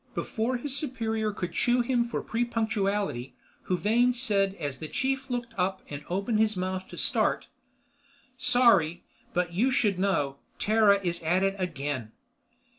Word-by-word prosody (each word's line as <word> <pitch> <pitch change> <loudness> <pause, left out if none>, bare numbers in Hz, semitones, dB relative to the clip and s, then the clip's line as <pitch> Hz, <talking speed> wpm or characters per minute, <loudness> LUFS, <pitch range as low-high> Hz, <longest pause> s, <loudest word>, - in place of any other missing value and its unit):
Before 235 +3 -1
his 270 +2 -3
superior 225 -6 -1
could 180 -4 -4
chew 245 +7 +2
him 240 0 +1
for 235 - -3
prepunctuality, 210 - -1 0.3
Huvane 225 +7 +3
said 200 -6 +1
as 140 -6 -5
the 155 - -5
chief 270 - -1
looked 245 -1 -3
up 190 +1 0
and 145 0 -6
opened 200 +5 0
his 215 -2 +2
mouth 185 0 -3
to - - -11
start: - - +1 0.9
"Sorry, 200 -11 +3 0.3
but 175 -1 0
you 230 +9 +2
should 210 -7 +1
know. 145 -8 0 0.2
Terra 210 -2 +4
is 170 -1 -1
at 175 +4 +2
it 195 0 +2
again." 140 - -3
200 Hz, 145 wpm, -28 LUFS, 180-235 Hz, 0.9 s, Terra